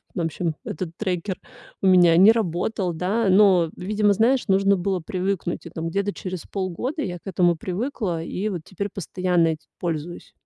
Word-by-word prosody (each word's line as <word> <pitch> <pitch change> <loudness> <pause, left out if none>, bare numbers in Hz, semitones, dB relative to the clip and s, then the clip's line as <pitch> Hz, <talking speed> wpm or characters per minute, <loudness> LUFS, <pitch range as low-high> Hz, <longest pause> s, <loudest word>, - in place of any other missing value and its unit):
В - - -2
общем, 165 0 -2
этот 170 +1 -4
трекер 185 -2 -2 0.4
у 190 - +2
меня 175 -3 +6
не 200 +5 +8
работал, 185 -2 -1
да. 195 +7 0
Но, 185 -4 +5
видимо, 205 +2 +2
знаешь, 240 +6 +2
нужно 195 0 +4
было 190 0 -1
привыкнуть. 180 +1 -3
И - - -7
там 165 0 -4
где-то 200 +3 -1
через 185 -2 -6
полгода 200 - -3
я 180 -3 -4
к - - -46
этому 175 -2 +2
привыкла 185 - -3
и 200 +5 -3
вот 180 -5 -4
теперь 200 +3 -5
постоянно 180 -2 0
этим 155 -1 -5
пользуюсь. 170 0 -4
185 Hz, 170 wpm, -23 LUFS, 170-200 Hz, 0.4 s, не